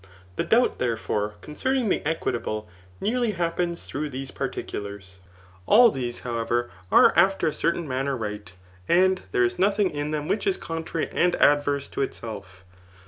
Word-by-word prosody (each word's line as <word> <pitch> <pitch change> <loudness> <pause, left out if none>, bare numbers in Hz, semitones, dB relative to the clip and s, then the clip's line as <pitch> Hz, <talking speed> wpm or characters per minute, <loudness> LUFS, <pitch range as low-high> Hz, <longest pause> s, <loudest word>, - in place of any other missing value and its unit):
The - - 0
doubt, 245 +2 +2
therefore, 110 -3 -1
concerning 255 - -1
the - - 0
equitable, 120 -8 -2 0.3
nearly 235 -1 0
Iu^)peas 170 -1 -2
through 150 +2 -4
these 135 0 -6
particulars. 100 -2 -6 0.5
All 235 +1 +7
these, 120 -5 -4
however, 120 0 -1 0.2
are - - +7
after 195 -1 +4
a 155 - +1
certain 170 -1 -1
manner 135 +1 -1
right, 105 -3 -5 0.4
and 185 +2 +4
there 125 - +3
is 120 0 0
nodiing 200 0 +2
in 145 0 -3
them 150 -1 -2
which 200 - -1
is 385 -1 +2
contrary 165 - -3
and 175 0 +2
adverse 145 -1 +3
to - - -3
itself. 100 -8 -6
145 Hz, 150 wpm, -25 LUFS, 120-180 Hz, 0.5 s, All